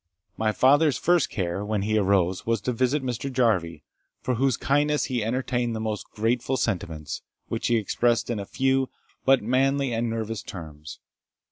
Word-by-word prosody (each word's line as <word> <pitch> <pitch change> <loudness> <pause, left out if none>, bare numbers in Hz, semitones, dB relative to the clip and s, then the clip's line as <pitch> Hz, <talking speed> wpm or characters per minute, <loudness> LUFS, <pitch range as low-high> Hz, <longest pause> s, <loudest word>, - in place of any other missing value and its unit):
My 110 -1 +1
father's 145 +5 +4
first 175 0 +2
care, 95 0 -2
when 105 -1 -1
he 110 +1 0
arose, 95 -2 +2
was 115 -1 0
to 125 - -1
visit 130 +4 +1
Mr. 130 +2 -3
Jarvie, 105 -10 +1 0.4
for 130 - -1
whose 130 +2 +1
kindness 145 +2 +1
he 125 -4 -1
entertained 120 0 -1
the - - -3
most 110 -1 -4
grateful 120 +4 0
sentiments, 80 -9 -3 0.3
which - - -2
he 120 - +3
expressed 115 +2 +1
in 115 - -1
very 100 -1 -5
few, 135 0 +1 0.4
but 135 -3 +4
manly 135 +2 +1
and 115 +1 0
nervous 115 -1 -3
terms. 75 -4 -9
115 Hz, 165 wpm, -25 LUFS, 105-130 Hz, 0.4 s, father's